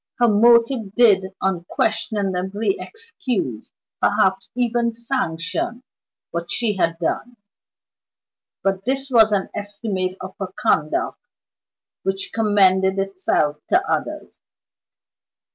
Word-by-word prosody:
Her 240 - +4
motive 230 0 +4
did 210 -6 +5 0.2
unquestionably 195 - -1
excuse, 255 - -4 0.3
perhaps 190 0 +2
even 240 -1 +1
sanction, 235 - -3 0.5
what 170 0 -4
she 225 -4 +1
had 165 -2 +1
done; 230 +8 -3 1.3
but 195 -1 0
this 270 +3 -2
was 220 -3 +6
an 200 -2 0
estimate 200 -3 -3
of 185 +1 -7
her 190 -2 -4
conduct 155 -8 0 0.8
which 195 0 -3
commended 190 -3 +3
itself 185 -6 0
to 365 +2 +2
others. - - -3
205 Hz, 95 wpm, -21 LUFS, 190-235 Hz, 1.3 s, was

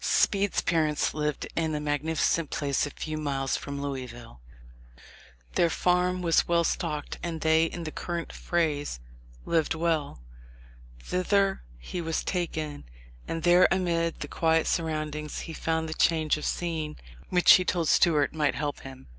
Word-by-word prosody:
Speed's 200 -1 +2
parents 155 -3 +1
lived 150 -1 -2
in 160 -2 0
a - - -1
magnificent 150 +2 0
place 140 -1 0
a - - -5
few 155 +1 -5
miles 135 -3 -1
from 140 0 -5
Louisville. 125 - -6 1.1
Their 170 - +3
farm 180 +1 +1
was 165 -1 +3
well 170 0 +3
stocked, 150 -3 -2
and 165 -2 -4
they, 160 +1 +4
in 170 +1 -5
the 155 - -5
current 170 +1 -4
phrase, 150 - -1 0.5
"lived 160 -1 +1
well." 160 - -1 0.8
Thither 195 - +1 0.2
he 115 - -5
was 165 -1 -2
taken, 155 -5 -3 0.4
and 165 0 -3
there 175 +1 +6
amid 170 -3 0
the - - -3
quiet 160 -1 +2
surroundings 155 -2 -2
he 165 - -7
found 160 0 -1
the 160 - -3
"change 160 -2 +2
of 150 - -5
scene" 160 -3 -2 0.3
which 180 -1 +7
he 185 - +5
told 175 -2 0
Stuart 150 -4 +3
might 150 -3 +1
help 145 -1 -3
him. 130 -1 -11
160 Hz, 150 wpm, -27 LUFS, 150-170 Hz, 1.1 s, which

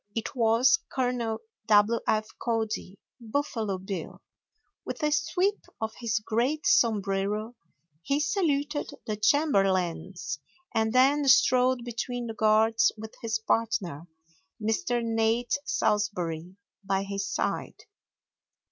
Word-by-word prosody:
It 225 - -3
was 235 - +4
Col. 245 -4 -1 0.3
W. 215 +2 +5
F. 215 0 +1
Cody, 220 -4 -2 0.2
"Buffalo 225 -4 -2
Bill." 185 -2 -6 0.6
With - - -6
a 300 - +2
sweep 360 +7 +1 0.2
of 220 0 -3
his 230 -2 0
great 235 +8 -1
sombrero 210 0 +1 0.5
he 280 - 0
saluted 295 -3 0 0.2
the 215 - -2
chamberlains, 195 - +1 0.3
and 220 0 +1
then 275 +4 +4
strode 255 -1 +4
between 245 +1 -4
the 225 - -5
guards 220 +1 +3
with 220 +1 -8
his 225 -1 -1
partner, 215 -8 -1 0.5
Mr. 225 +2 0
Nate 225 +1 +1
Salsbury, 185 -5 -1 0.3
by 195 0 0
his 200 0 -3
side. - - -3
225 Hz, 110 wpm, -28 LUFS, 205-250 Hz, 0.6 s, W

